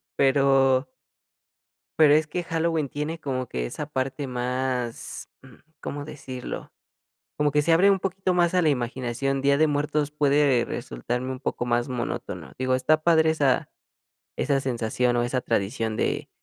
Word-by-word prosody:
pero 135 -1 +3 1.1
pero, 150 -2 +7
es 155 +1 +3
que 175 +3 -3
Halloween 165 -3 -1
tiene 150 +4 -4
como 130 -4 -3
que 60 - -3
esa 105 - -5
parte 135 -1 -3
más, 125 -1 -3
mm, 130 -2 -16 0.2
¿cómo 145 0 -5
decirlo?, 130 -4 -7 0.7
como 150 -1 +1
que 150 +1 +3
se 165 - +2
abre 180 +5 +5
un 195 -1 +3
poquito 190 0 -1
más 175 -1 +3
a 180 - +4
la 160 - +3
imaginación, 130 0 -1
Día 140 0 +4
de 155 0 +4
Muertos, 150 0 0
puede 145 -4 +3
resultarme 120 - -4
un 130 - -4
poco 125 -2 -3
más 120 +1 +1
monótono. 125 -2 -5
Digo, 130 0 +1
está 140 +5 +2
padre 160 -2 +5
esa 145 -5 +1 0.7
esa 140 -2 +1
sensación 125 -1 0
o 120 - +2
esa 120 +2 0
tradición 115 0 -1
de - - -1
135 Hz, 155 wpm, -25 LUFS, 125-150 Hz, 1.1 s, pero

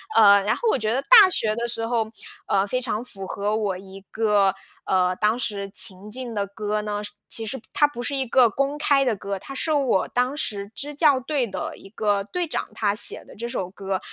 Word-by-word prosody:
呃， 200 -2 +7
然 215 - +2
后 475 - -2
我 - - +1
觉 215 0 -1
得 265 +3 0
大 435 -6 +8
学 215 -10 0
的 235 0 -2
时 225 -1 -2
候， 225 -2 0 0.4
呃， 195 0 +2
非 255 +5 -2
常 230 -2 -1
符 195 -6 -7
合 205 +2 -2
我 200 -4 -1
一 195 +1 -11
个， 205 -3 +2 0.3
呃， 185 -1 +2
当 215 +4 +1
时 200 -4 -3
情 195 +2 +3
境 250 -1 -5
的 200 -1 0
歌 210 +1 -3
呢， 210 0 -3
是 - - -6 0.2
其 225 - -1
实 265 +4 -4
它 295 - +4
不 240 -4 -8
是 285 +1 -2
一 265 -1 0
个 240 0 +5
公 275 +5 -1
开 285 -2 +3
的 245 -4 +1
歌， 200 0 -5
它 275 - -9
是 315 +3 0
我 270 -9 +1
当 250 +4 -1
时 200 -5 -3
支 295 +1 -4
教 290 -4 +4
队 270 -1 -1
的 190 - -5
一 195 - -13
个 205 -2 0
队 350 - -3
长， - - -3
他 205 -2 +1
写 - - +1
的 - - -15
这 235 +3 -5
首 185 -5 -4
歌， 195 -1 -3
220 Hz, 245 characters per minute, -23 LUFS, 200-260 Hz, 0.4 s, 大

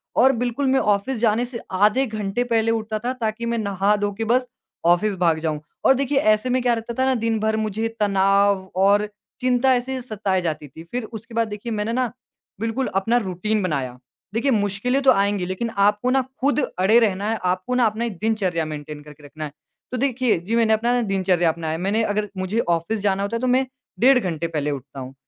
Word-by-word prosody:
और 260 +2 +6
बिल्कुल 245 +3 -1
मैं 265 0 +3
ऑफ़िस 210 +5 +1
जाने 230 +1 +2
से 240 -2 -7
आधे 210 +8 +3
घंटे 215 +1 -2
पहले 225 -2 +1
उठता 220 -1 -2
था 255 - 0
ताकि 235 -2 -3
मैं 235 0 -1
नहा 200 -1 +1
धो 205 0 -1
के 225 - -2
बस 250 +3 +2 0.4
ऑफ़िस 190 +4 +3
भाग 160 -2 +3
जाऊँ। 155 -2 -2 0.3
और 265 - +7
देखिए, 275 +1 0
ऐसे 215 +2 +2
में 255 0 +1
क्या 240 -1 +2
रहता 230 +1 -4
था 260 - +3
ना 265 -1 +2
दिन 225 -1 +1
भर 220 0 0
मुझे 220 +1 -1
तनाव 195 -1 +3
और 200 +2 +3 0.3
चिंता 255 +1 +3
ऐसे 250 +2 -2
ही 255 - -4
सताए 205 -5 -1
जाती 155 -3 -3
थी। 160 +5 -12
फिर 245 -1 -2
उसके 225 +1 -10
बाद 230 -1 +1
देखिए 210 +3 -6
मैंने 215 +2 -1
ना, 250 -3 0 0.5
बिल्कुल 225 +4 -1
अपना 225 +5 +2
रूटीन 210 +1 -1
बनाया। 135 -8 -2 0.4
देखिए, 265 +5 +1
मुश्किलें 210 +5 0
तो 265 - +7
आएँगी 200 -2 +1
लेकिन 185 +6 -3
आपको 205 +4 +3
ना 265 0 +3 0.2
खुद 285 +2 +2 0.2
अड़े 215 +6 +5
रहना 205 -1 +1
है, 225 - 0
आपको 185 +7 -1
ना 250 -1 +4
अपना 220 +2 0
एक 205 -7 -5
दिनचर्या 190 -7 0
मेंटेन 150 -1 -7
करके 150 0 -15
रखना 155 +2 -7
है। 145 - -7 0.4
तो 255 - -2
देखिए, 255 -4 +1
जी 210 +7 -2
मैंने 225 -1 +3
अपना 230 +2 +1
ना 245 - +2
दिनचर्या 185 -3 +2
अपनाया। 160 -1 -3
मैंने 200 +5 0
अगर 210 -1 -1
मुझे 185 +5 -1
ऑफ़िस 170 +6 0
जाना 200 -1 +1
होता 200 +3 -2
है, 230 - -1
तो 255 - 0
मैं 255 +1 +3 0.3
डेढ़ 260 +1 +6
घंटे 170 -6 -2
पहले 150 -3 -2
उठता 135 0 -7
हूँ। 130 0 -7
215 Hz, 215 wpm, -22 LUFS, 190-240 Hz, 0.5 s, और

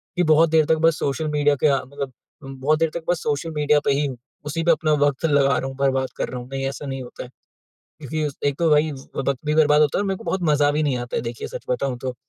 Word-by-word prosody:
कि 180 - +2
बहुत 160 0 +4
देर 160 -1 +4
तक 160 - +2
बस 165 - +2
सोशल 140 +3 -1
मीडिया 145 -1 +2
के - - +6
आ 140 -1 +3
मतलब 140 0 -6 0.3
बहुत 135 +3 0
देर 165 -1 +2
तक 170 - -5
बस 175 -3 +1
सोशल 150 +2 -2
मीडिया 150 0 +3
पे - - +3
ही 145 +1 +1
हूँ। 130 -3 -4 0.3
उसी 165 +3 -2
पे 170 - +4
अपना 155 -1 +1
वक़्त 145 +3 -1
लगा 140 -2 +3
रहा 135 - -2
हूँ, 135 - -7
बर्बाद 135 -1 +1
कर - - -2
रहा 125 - -5
हूँ। 120 - -11
नहीं, 135 0 -3
ऐसा 140 +2 -6
नहीं 135 -1 -4
होता 120 - -9
है। 125 - -11 0.7
क्योंकि 155 +2 -3
उस 140 - -6
एक 140 -1 +1
तो 165 -2 +2
वही 150 +1 +3
व 135 - -8 0.2
वक़्त 135 -1 -1
भी 150 - +1
बर्बाद 150 -1 +4
होता 145 - +1
है - - +1
और - - -2
मेरे 190 - -2
को - - -12
बहुत 190 -1 -2
मज़ा 145 -1 +3
भी 155 +1 0
नहीं 140 -4 +1
आता 120 0 -5
है, - - -1
देखिए, 115 -1 -5
सच - - -8
बताऊँ 125 0 -1
तो। 130 0 -4
145 Hz, 290 wpm, -22 LUFS, 135-155 Hz, 0.7 s, के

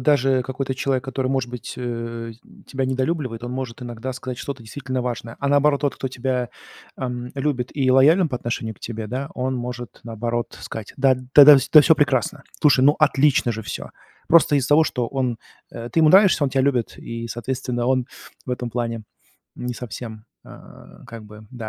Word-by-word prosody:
даже 135 -1 +3
какой-то 130 +1 -4
человек, 130 0 -1
который, 130 -1 -2
может 130 -2 -1
быть, 125 -1 -7
э, 115 -1 -5 0.3
тебя 135 -1 -2
недолюбливает, 130 -2 -2
он 120 - -5
может 130 -2 -5
иногда 120 +1 -5
сказать 125 -1 -6
что-то 140 -4 -6
действительно 130 +2 -4
важное, 120 -2 -5
а 140 - -1
наоборот 145 0 +3
тот, 145 - 0
кто 130 - -4
тебя, 125 -1 -2 0.5
эм, 125 -1 -4
любит 135 -3 -2
и 135 -3 +1
лоялен 155 +7 +5
по 125 - -3
отношению 115 -2 -4
к - - -28
тебе, 110 -2 -5
да, 130 +5 -4
он 130 +1 -2
может 120 -2 -6
наоборот 120 +1 -3
сказать: 110 -2 -7
"Да, 135 -1 +4 0.2
да-да, 145 0 +10 0.2
да 155 - +10
всё 160 +2 +5
прекрасно. 140 -1 0 0.2
Слушай, 135 -4 +5
ну, 145 +2 +5
отлично 140 -5 +3
же 110 0 -6
всё." - - -6 0.4
Просто 160 -3 +5
из-за 135 -1 0
того, 155 +2 +5
что 125 -5 -2
он 125 -3 -2 0.3
э, 115 0 -7
ты 165 - +2
ему 155 - +6
нравишься, 190 -1 +6
он 135 - 0
тебя 135 0 +1
любит, 130 -4 0
и, 115 0 -6
соответственно, 120 +1 -3
он 130 -1 +1 0.4
в - - -5
этом 125 -1 -3
плане 115 -1 -3 0.5
не 125 0 -4
совсем, 115 -2 -8 0.2
э, - - -14 0.6
как 115 -2 -10
бы, 105 0 -13
да, 115 -4 -7
125 Hz, 190 wpm, -22 LUFS, 120-135 Hz, 0.6 s, да-да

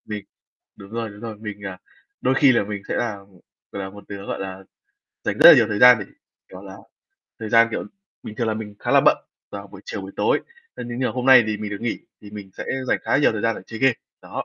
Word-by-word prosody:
Mình 105 -2 -6 0.5
đúng 100 0 -13
rồi, 115 -1 -4
đúng 100 +1 -13
rồi, 115 -2 -7
mình, 105 -2 -8
à, 95 -1 -7 0.4
đôi 130 - +1
khi 135 -1 +5
là 115 - +2
mình 100 -1 -6
sẽ - - -2
là, 115 -3 -1
ừm, 100 0 -18 0.4
gọi 100 - -5
là, 95 - -6
một 100 +1 -13
đứa, 100 0 -8
gọi - - -4
là, 95 0 -6 0.6
dành - - -2
rất - - +10
là - - +10
nhiều 115 - +4
thời 105 -2 -2
gian 125 -1 +8
để, 100 - -6 0.4
kiểu 95 +1 -11
là, 95 -1 -10 0.6
thời 110 - -5
gian, 115 +1 +5
kiểu, - - -3 0.4
bình 105 - -8
thường 115 -1 -1
là 110 - 0
mình 105 -1 -7
khá - - -4
là - - +6
bận - - +4 0.3
vào 100 0 -8
buổi 100 -1 -13
chiều, 105 - -5
buổi 95 - -9
tối, - - +2 0.3
ơ, - - -7
thế 120 - -5
nhưng 130 - -1
hôm 125 0 -3
nay 130 -3 +8
thì 110 -1 -1
mình 105 -1 -6
được 100 - -5
nghỉ, 120 -1 -2 0.2
thì 105 - -12
mình 100 -2 -9
sẽ - - -4 0.2
dành - - +2
khá - - +1
nhiều 145 - +3
thời 105 -2 -4
gian 115 0 +1
để - - -9
chơi 115 - -8
game. 135 -3 +4 0.3
Đó. - - -6
105 Hz, 270 wpm, -22 LUFS, 100-115 Hz, 0.6 s, rất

